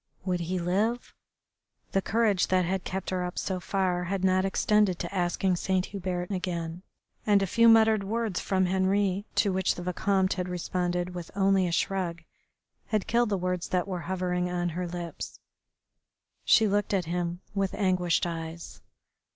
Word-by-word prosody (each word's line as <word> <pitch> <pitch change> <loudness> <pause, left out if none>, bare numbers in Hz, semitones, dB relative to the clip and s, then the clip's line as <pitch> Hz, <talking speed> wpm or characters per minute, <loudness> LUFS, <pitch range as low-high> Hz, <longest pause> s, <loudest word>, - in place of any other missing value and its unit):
Would 180 -2 0
he 175 +2 -2
live? 205 +8 -1 0.8
The 195 - +2
courage 215 -3 +2
that 185 -1 +2
had 185 +1 -1
kept 190 0 -4
her 185 -1 -1
up 180 0 -5
so 185 -2 -2
far 180 -1 -1
had 190 +1 -2
not 185 0 +3
extended 205 -1 +2
to 175 +2 -5
asking 180 0 +1
Saint 185 +1 0
Hubert 180 -1 -3
again, 175 -3 -3 0.4
and 205 -2 +4
a - - +2
few 230 +5 +5
muttered 220 -2 +5
words 220 -1 -1
from 190 -1 +1
Henri, 190 +1 +1
to 200 -3 +2
which 190 0 +1
the 175 - -6
Vicomte 190 +1 +1
had 180 -1 -3
responded 180 0 -2
with 175 -2 -6
only 195 -1 +3
a - - -2
shrug, 170 -2 -1 0.6
had 215 -3 0
killed 235 -1 +2
the 200 - +1
words 180 -1 -2
that 180 0 0
were 185 -2 -3
hovering 180 -1 -1
on 175 0 -1
her 175 +2 -3
lips. 170 -1 -6 1.1
She 220 - +5
looked 205 0 +1
at 185 -3 0
him 175 +1 -2
with 195 -2 -1
anguished 180 -4 +1
eyes. 165 0 -6
185 Hz, 165 wpm, -28 LUFS, 180-195 Hz, 1.1 s, few